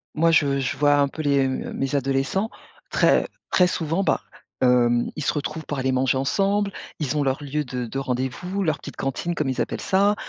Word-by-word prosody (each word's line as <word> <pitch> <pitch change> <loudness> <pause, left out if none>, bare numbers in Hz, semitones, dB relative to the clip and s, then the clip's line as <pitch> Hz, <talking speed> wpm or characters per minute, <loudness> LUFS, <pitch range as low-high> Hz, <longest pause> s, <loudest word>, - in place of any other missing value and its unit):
moi 165 +2 +4
je 140 -3 +3
je 130 - -1
vois 145 0 +4
un 140 -1 +3
peu 155 +3 -6
les, 140 -2 +3
heu - - +1
mes, 130 - -3
heu - - -6
mes 135 +2 -2
adolescents, 135 - 0 0.4
très, - - +3 0.2
très 180 -1 +5
souvent, 165 +2 -1
bah, - - +1 0.4
hem, 120 -1 +3
ils 155 - -4
se 150 - +2
retrouvent 155 +1 -4
pour 145 - -4
aller 130 0 0
manger 130 +1 +2
ensemble, 200 +7 +1 0.3
ils 150 -1 -1
ont 150 - +2
leur 135 +2 -1
lieu 150 +2 -2
de 125 -2 -4
de 135 +4 -4
rendez-vous, 130 +9 -2
leur 155 -5 0
petite - - -9
cantine 155 +6 -2
comme 150 -4 -1
ils 130 - -1
appellent - - -3
ça. 200 +2 +3
145 Hz, 220 wpm, -24 LUFS, 130-165 Hz, 0.4 s, très